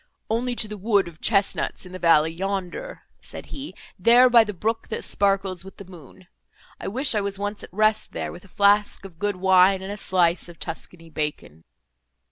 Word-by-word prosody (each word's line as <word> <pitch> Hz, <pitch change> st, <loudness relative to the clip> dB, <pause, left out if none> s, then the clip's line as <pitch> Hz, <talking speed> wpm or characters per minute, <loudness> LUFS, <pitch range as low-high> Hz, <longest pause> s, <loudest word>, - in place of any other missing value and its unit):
"Only 245 Hz, +2 st, -1 dB
to 220 Hz, -, +1 dB
the 210 Hz, -1 st, -8 dB
wood 200 Hz, -2 st, +2 dB
of 165 Hz, -2 st, -13 dB
chesnuts 200 Hz, -2 st, +1 dB
in 180 Hz, -, -12 dB
the 185 Hz, -, -8 dB
valley 160 Hz, -2 st, +4 dB
yonder," 195 Hz, -, -5 dB, 0.2 s
said -, -, -9 dB
he, 275 Hz, -7 st, -7 dB, 0.2 s
"there, 240 Hz, +6 st, +6 dB
by 235 Hz, -2 st, +7 dB
the 210 Hz, -, -5 dB
brook, 220 Hz, +4 st, -3 dB
that 220 Hz, -, -5 dB
sparkles 195 Hz, -2 st, 0 dB
with 195 Hz, -, -13 dB
the 200 Hz, -, -10 dB
moon; 175 Hz, -6 st, -15 dB, 0.5 s
I -, -, -6 dB
wish 260 Hz, +7 st, +1 dB
I 210 Hz, -, +1 dB
was 200 Hz, -1 st, -3 dB
once 205 Hz, +1 st, -4 dB
at -, -, -11 dB
rest 215 Hz, +2 st, +1 dB
there, -, -, -4 dB
with 175 Hz, -, -12 dB
a -, -, -17 dB
flask 205 Hz, +1 st, +2 dB
of 170 Hz, -4 st, -13 dB
good 205 Hz, 0 st, -1 dB
wine, 190 Hz, +1 st, +4 dB
and 195 Hz, -, -6 dB
a 205 Hz, -, -5 dB
slice 175 Hz, -3 st, +1 dB
of 170 Hz, -, -13 dB
Tuscany 165 Hz, +1 st, -8 dB
bacon." 150 Hz, -, -5 dB
195 Hz, 200 wpm, -24 LUFS, 180-210 Hz, 0.5 s, by